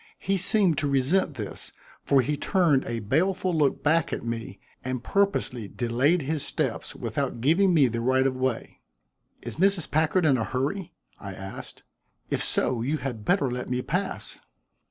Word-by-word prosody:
He 195 - -1
seemed 190 -3 +3
to 150 - 0
resent 140 +4 +1
this, 105 -5 -7 0.3
for 140 -2 +3
he 150 +3 -1
turned 160 -5 +2
a 115 -1 -3
baleful 180 - +1
look 145 -3 +1
back 160 +1 +2
at - - -4
me 115 -4 -5 0.2
and 130 -2 -3
purposely 195 - 0
delayed 130 - +1
his 150 +1 -2
steps - - -3
without - - -3
giving 170 +10 +3
me 150 -6 +5
the 115 0 -3
right 130 +2 +2
of 135 -1 +1
way. 130 -2 -3 0.6
"Is - - -6
Mrs. 190 -1 +1
Packard 160 +3 +2
in 140 -4 +4
a - - 0
hurry?" 145 - -3 0.2
I 100 -2 -7
asked. 95 0 -9 0.5
"If - - +1
so, 120 -3 0
you 140 +6 0
had 125 -6 -5
better 180 -6 +2
let 125 +1 -4
me 125 0 -1
pass." 185 +4 -3
140 Hz, 170 wpm, -26 LUFS, 125-175 Hz, 0.6 s, me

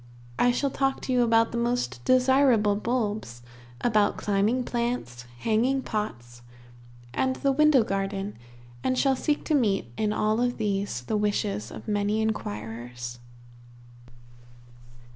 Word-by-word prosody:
I 245 - +5
shall 275 +3 0
talk 270 0 0
to 260 - -2
you 250 - +4
about 230 -1 +3
the 235 - -2
most 235 - -1
desirable 255 -5 +4
bulbs, 210 - -2 0.4
about 215 -3 +2
climbing 210 +5 +1
plants, 235 - -3 0.2
hanging 250 +5 +1
pots, 120 - -5 0.7
and 260 - 0
the 275 - +1
window 295 -3 +5
garden, 195 0 -3 0.5
and 255 0 +1
shall 270 0 +3
seek 295 +3 -1
to 315 - 0
meet 205 - +1
in 215 -1 0
all 215 0 +1
these 205 - -1
the 215 - -1
wishes 205 - -1
of 110 0 -10
many 205 +1 0
inquirers. 120 - -4
215 Hz, 125 wpm, -26 LUFS, 195-250 Hz, 0.7 s, I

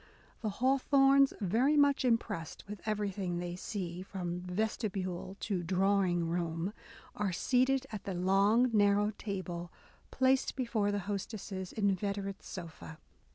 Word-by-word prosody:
The 220 - -1
Hawthornes, 270 +3 +4
very 240 +10 +3
much 285 -2 +4
impressed 225 -8 -1
with 210 -1 -7
everything 200 -4 -1
they 175 0 -4
see, 180 -2 -4
from 180 -2 -4
vesti 215 +4 -1
bule 185 0 -4
to 195 -4 -1
drawing 185 -1 +2
room, 170 +2 -2 0.4
are 205 -2 -1
soon 170 - -4 0.2
seated 270 +1 +2
at 205 -2 -6
the 195 -3 -3
long 200 +7 +3
narrow 205 0 +4
table 180 -4 -4 0.4
placed 260 0 +2
before 230 -5 0
their 205 0 -1
hostess's 195 -1 -5
inveterate 200 -1 -1
sofa. 165 -3 -8
200 Hz, 130 wpm, -32 LUFS, 180-220 Hz, 0.4 s, Hawthornes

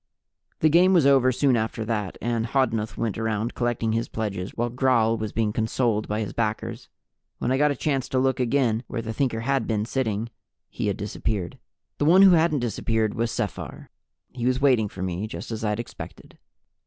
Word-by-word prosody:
The 155 - +5
game 180 +4 +5
was 170 -6 +5
over 135 -2 +5
soon 130 0 +2
after 110 0 -2
that, 105 -4 -2
and 115 -1 0
Hodnuth 115 -4 0
went 110 -2 -2
around 110 +1 -1
collecting 120 -2 -1
his 115 +1 -1
pledges 100 -4 -3
while 120 0 -1
Gral 120 -3 +2
was 110 -2 -4
being 110 -1 0
consoled 110 -1 0
by 105 +1 -1
his 105 - -4
backers. 110 -2 -3 0.5
When 125 - -1
I 130 - +2
got 150 0 +4
a 145 - 0
chance 135 -1 -1
to 130 - -1
look 130 0 +1
again 125 -2 +1
where 115 -2 -4
the 110 0 -4
Thinker 115 -3 -1
had 135 -1 0
been 105 -2 0
sitting, 115 -3 -2 0.4
he - - -3
had 100 - -1
disappeared. 105 -3 -3 0.4
The 145 - +1
one 180 +5 +7
who 195 - +8
hadn't 160 -4 +3
disappeared 110 -1 0
was 115 0 -1
Sephar. - - -5 0.4
He 125 -1 -2
was 130 0 +1
waiting 130 -6 +3
for 95 - -6
me, 95 +3 -3
just 110 - -7
as 110 0 -4
I'd 105 0 0
expected. 120 - -9
115 Hz, 195 wpm, -25 LUFS, 110-130 Hz, 0.5 s, who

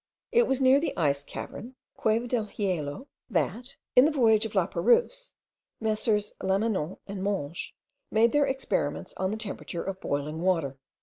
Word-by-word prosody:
It 475 0 +4
was 270 - +1
near 260 +2 +6
the 325 - -3
Ice 140 -3 +1
Cavern 240 - -8 0.2
(Cueva 220 +2 +1
del 235 -3 0
Hielo), 185 - -3 0.2
that, 235 +6 -1 0.2
in 250 - +8
the 310 - +3
voyage 225 -6 +4
of 215 - -14
Laperouse, - - +2 0.4
Messrs. 215 -1 +1
Lamanon 190 -3 0
and 195 -1 -6
Monges 175 -6 -3 0.4
made 225 +2 +4
their 290 -1 +3
experiments 265 - -2
on 190 0 0
the 215 - -2
temperature 200 -5 -5
of 190 -1 -5
boiling 150 +3 -2
water. 165 -7 0
215 Hz, 150 wpm, -28 LUFS, 180-250 Hz, 0.4 s, in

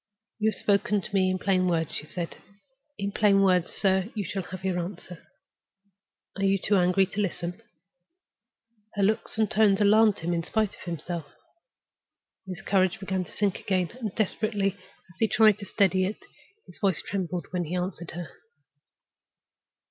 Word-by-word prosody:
"You 220 0 +3
have - - -4
spoken 205 0 +2
to 195 - -9
me 190 -1 +3
in 185 - 0
plain 185 -1 +1
words," 165 -3 0
she 150 - -5
said. 170 0 -5 0.6
"In 200 0 -2
plain 200 -1 +4
words, 180 -2 +3
sir, 190 0 +1
you 210 - -1
shall 195 +4 -3
have 185 +1 -8
your 185 -2 0
answer. 175 -1 -7 1.1
Are 195 - -3
you 195 0 +3
too 205 +2 +1
angry 180 +1 +4
to 200 +2 -3
listen?" 180 0 -3 1.3
Her 200 - +1
looks 220 +2 0
and 220 -1 +3
tones 215 -2 +4
alarmed 215 0 +5
him, 170 +1 -2
in 170 - 0
spite 215 +4 0
of - - -14
himself. 170 -2 -4 1.2
His 185 -3 -6
courage 185 -2 +2
began 190 -1 -2
to - - -15
sink 200 -2 0
again; 185 -3 0
and, 220 -5 -3
desperately 210 -1 0 0.4
as 175 - -21
he 225 - +4
tried 215 -1 +5
to 200 - -8
steady 190 -2 +2
it, 205 +3 -5 0.4
his 180 - -15
voice 195 -4 +1
trembled 180 -4 -3
when 180 -1 -1
he 165 +4 -4
answered 180 -2 -3
her. 175 -1 -5
190 Hz, 170 wpm, -27 LUFS, 180-205 Hz, 1.3 s, alarmed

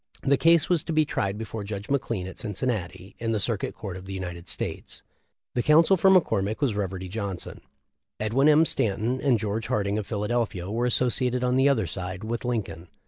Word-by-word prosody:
The 140 0 +4
case 165 +3 +4
was 175 -4 +1
to - - -3
be 155 0 +3
tried 100 -7 -2
before 110 -1 -5
Judge 100 0 -6
McLean 120 -8 -1
at 95 - -8
Cincinnati, 100 -4 -3
in 115 -1 -1
the 110 - 0
Circuit 105 0 -1
Court 100 -4 -6
of 95 0 -9
the 95 - -7
United 90 -2 -6
States. - - -5 0.5
The 120 - +1
counsel 160 +7 +5
for 190 +1 +4
McCormick 110 - +2
was 140 -7 +1
Reverdy 95 -2 -3
Johnson. 100 -2 -5 0.6
Edwin 125 +7 +3
M. 155 +2 +6
Stanton 115 +1 0
and 135 -5 +3
George 110 +1 -3
Harding, 100 0 0
of 105 - -6
Philadelphia, 105 -3 -2
were 120 +3 0
associated 125 +1 +1
on 125 0 +2
the 135 +2 +4
other 130 -5 +2
side 95 +1 -5
with 115 +1 -3
Lincoln. 95 -9 -3
110 Hz, 195 wpm, -26 LUFS, 100-130 Hz, 0.6 s, M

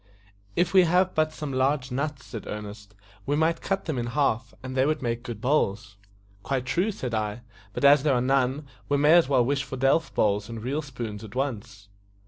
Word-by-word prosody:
"If 180 - +1
we 185 -2 +7
had 180 +2 +2
but 155 0 +1
some 150 -3 -6
large 130 0 0
nuts," 140 +1 -3
said 115 -4 -8
Ernest, 105 0 -8 0.3
"we 145 - +1
might 160 +2 +1
cut 195 0 -2
them 155 -6 -2
in 120 - -2
half, 115 -2 0
and 130 0 -6
they 130 +1 +3
would 155 -2 -1
make 120 0 -2
good 120 -3 -7
bowls." 110 -6 0 0.5
"Quite 130 +4 -2
true," 175 +11 0
said 125 - -5
I; 105 +1 -2 0.3
"but 115 - -1
as 140 0 +7
there 140 -2 +2
are - - +2
none, 135 +2 +1 0.2
we 145 - +2
may 150 +3 +5
as 170 -5 +5
well 130 -4 +3
wish 140 +1 0
for 135 - -7
delf 135 +3 +2
bowls 105 +1 +1
and 115 -1 -7
real 140 +5 -1
spoons 120 -7 -7
at 105 0 -11
once." 105 -7 -4
130 Hz, 210 wpm, -26 LUFS, 115-150 Hz, 0.5 s, we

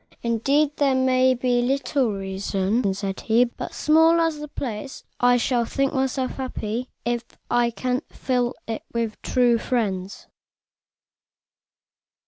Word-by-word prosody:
"Indeed, 275 +6 +1
there 275 -2 +3
may 260 0 +3
be 245 0 +1
little 270 -1 +1
reason," 195 +2 -1
said 195 -1 -4
he; 230 +2 +3
"but, 240 - -7
small 320 +2 +4
as 325 -2 +1
the 300 - -6
place 265 -2 -6
is, - - -36 0.2
I 245 0 +5
shall 245 0 +1
think 275 +4 -1
myself 265 -1 -1
happy 250 -2 -4 0.2
if 240 0 0 0.3
I 240 0 +3
can 250 +2 -2
fill 250 -1 -1
even 225 -1 -2
it - - -19
with 230 -2 -3
true 240 -2 +2
friends." 200 -7 -2
245 Hz, 135 wpm, -24 LUFS, 225-265 Hz, 0.3 s, I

